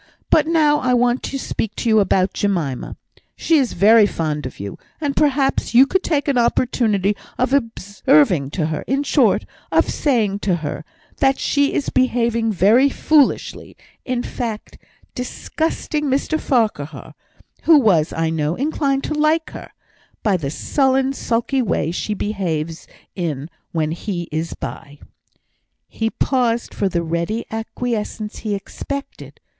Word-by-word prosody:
But 310 -1 +4
now 305 -3 +3
I 250 -1 +1
want 245 +1 +2
to 275 - -4
speak 220 -5 -3
to - - -3
you 220 -1 +5
about 190 -1 +2
Jemima. 170 -11 -2 0.4
She 325 -2 +2
is 260 -4 0
very 215 +1 +6
fond 150 -6 -3
of - - -12
you, 100 0 -7 0.2
and 290 -3 -2
perhaps 275 -4 +1
you 260 +3 +8
could 375 +6 0
take 295 -6 0
some 275 -4 +1
opportunity 225 -4 +1 0.2
of 255 +2 0
observing 230 - +2
to 165 - 0
her 150 - -3
in 275 +2 0
short, - - +2 0.3
of - - +3
saying 220 -9 0
to 190 -3 +1
her, 150 +2 -4 0.3
that 270 0 +3
she 285 0 +1
is 285 - -1
behaving 235 -3 +1
very 220 +8 +4
foolishly 295 0 +1 0.3
in 250 -1 -2
fact, 225 -4 -5 0.3
disgusting 300 +4 -3
Mr 280 +3 0
Farquhar 210 - -1 0.5
(who 325 -2 +7
was, 180 - +3
I 165 0 -1
know, 155 0 -1
inclined 275 0 0
to - - -2
like 310 +2 +1
her) - - -9 0.5
by 205 -3 +2
the 150 -6 -2
sullen, 265 - +1
sulky 240 +1 -1
way 170 -7 0
she 210 +4 -3
behaves 170 -6 -3 0.3
in, 160 -4 -4 0.2
when 155 -2 -1
he 175 0 -4
is 160 +2 -3
by." 145 -2 -8 0.9
He 225 0 -2
paused 240 -2 0
for 200 - 0
the 170 -2 -1
ready 170 +7 -2
acquiescence 220 -1 -4
he 210 -2 -2
expected. 280 +7 -7
230 Hz, 145 wpm, -20 LUFS, 180-270 Hz, 0.9 s, you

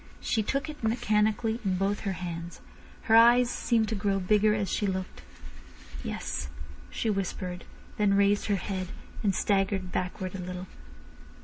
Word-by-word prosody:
She 225 - 0
took 275 +8 -1
it 300 -5 -8
mechanically 220 0 +1
in 190 -2 +1
both 195 +2 0
her 195 -2 -2
hands. 170 -1 -6 0.4
Her 225 - +4
eyes 240 +2 +7
seemed 225 -3 +1
to - - -1
grow 200 -1 0
bigger 210 +3 +3
as 205 -2 -1
she 205 - 0
looked. 185 - -4 0.8
"Yes," 65 - -3 0.4
she 225 - -1
whispered, 185 -2 -3 0.3
then 205 -2 +3
raised 200 +1 +3
her 205 - +2
head, 185 0 -3 0.3
and 200 -5 +1
staggered 195 -2 +1
backward 185 0 -3
a 195 - -5
little. 180 0 -5
200 Hz, 150 wpm, -28 LUFS, 185-220 Hz, 0.8 s, eyes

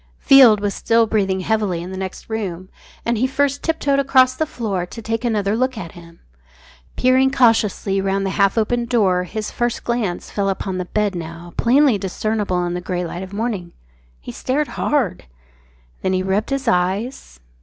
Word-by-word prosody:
Field 250 -7 +7
was 205 -1 -1
still 230 0 +2
breathing 195 -4 0
heavily 210 -4 0
in 180 - -7
the - - -6
next 190 0 -6
room, 190 -5 -4 0.4
and 235 -2 0
he 255 - +2
first 280 +1 0
tip 325 0 -1
toed 280 -1 +1
across 260 -2 +4
the 315 - -1
floor 205 -9 -3
to 180 +6 -9
take 225 +1 -3
another 210 -3 0
look 255 +1 0
at 170 -6 -6
him. 170 -1 -15 0.8
Peering 260 +1 +3
cautiously 220 -6 +2
round 195 0 0
the 190 - -1
half 200 +2 +2
opened 235 +2 0
door 190 -7 +2
his 215 +3 -5
first 240 -1 -2
glance 230 -7 -2
fell 200 -1 0
upon 190 -1 -3
the 180 - -3
bed 210 +2 -1
now 170 0 -8
plainly 255 -2 +3
discernible 195 -1 -1
in 175 - -2
the 180 - -3
grey 180 0 -3
light 170 +1 -6
of 190 0 -8
morning. 200 -5 -3 0.5
He - - -8
stared 285 +3 -1
hard. 250 - -1 0.8
Then 185 - 0
he 185 0 0
rubbed 195 +3 0
his 275 -1 -2
eyes. 190 - -1
210 Hz, 185 wpm, -20 LUFS, 185-240 Hz, 0.8 s, Field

